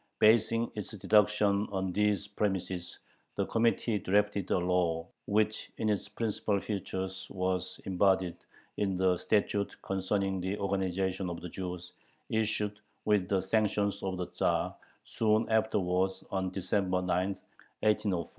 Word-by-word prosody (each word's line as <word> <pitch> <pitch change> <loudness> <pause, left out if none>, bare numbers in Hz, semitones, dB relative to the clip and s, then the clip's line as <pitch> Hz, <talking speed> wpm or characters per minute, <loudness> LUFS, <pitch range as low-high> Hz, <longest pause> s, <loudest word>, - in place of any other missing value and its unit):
Basing 115 +1 +4
its 105 -3 -5
deductions 105 +1 +3
on 95 -2 -1
these 105 0 +1
premises, 95 -4 -2 0.4
the - - 0
Committee 115 -1 +1
drafted 100 0 +1
a - - +3
law 90 -2 +1 0.2
which 105 +1 +1
in 110 - 0
its 105 0 -1
principal 105 -2 -1
features 95 -2 -4
was 95 0 -2
embodied 95 -1 +2 0.4
in 95 -3 0
the 95 0 +3
"Statute 105 -1 0
Concerning 95 0 -1
the 95 +3 -2
Organization 95 -1 -1
of 85 - -5
the 90 - -7
Jews," 90 0 -6 0.4
issued, 105 -2 0 0.3
with 105 -3 +2
the 95 -2 +2
sanction 105 0 +1
of 95 -1 -2
the 90 - -2
Tzar, - - 0 0.3
soon 110 0 +1
afterwards, 95 -4 +1
on 95 -1 0
December 95 0 0
9, 90 +1 +1 0.5
1804. 105 -5 +2
2. - - -18
95 Hz, 135 wpm, -31 LUFS, 95-105 Hz, 0.5 s, Basing